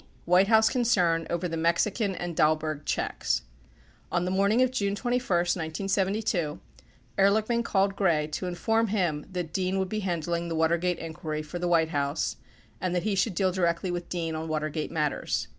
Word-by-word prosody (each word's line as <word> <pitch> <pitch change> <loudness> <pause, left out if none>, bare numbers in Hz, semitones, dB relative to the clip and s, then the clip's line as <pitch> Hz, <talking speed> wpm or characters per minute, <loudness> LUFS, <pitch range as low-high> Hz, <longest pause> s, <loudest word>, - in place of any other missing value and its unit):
White 180 +3 +5
House 220 0 +5
Concern 180 -10 +2
Over 170 +1 -1
the 165 - -4
Mexican 190 +5 +1
and 175 -2 -4
Dahlberg 155 -2 +1
Checks - - -1 0.7
On 175 0 +1
the 180 - -1
morning 200 +6 +3
of 255 - +1
June 200 -5 0
21, 245 +3 0
1972, 180 0 0 0.6
Ehrlichman 215 +4 +3
called 195 -2 +1
Gray 170 -7 +2
to 155 +4 -4
in 175 - -3
form 225 +5 +1
him 175 -8 -1
that 175 -3 -4
Dean 190 +1 0
would 190 -1 -1
be 215 - -2
handling 170 -3 -2
the 165 - -3
Watergate 170 +2 +1
inquiry 155 -2 -5
for 155 +3 -6
the 175 - -1
White 165 -2 +3
House 145 0 -1 0.4
and 180 -1 -1
that 175 - -1
lie 215 - +1
should 190 0 +1
deal 190 +1 +2
directly 175 0 0
with 175 0 -4
Dean 165 -2 -2
on 160 +1 -4
Water 155 -1 -1
gate 155 0 -3
matters. 150 -3 -1
175 Hz, 180 wpm, -27 LUFS, 160-195 Hz, 0.7 s, White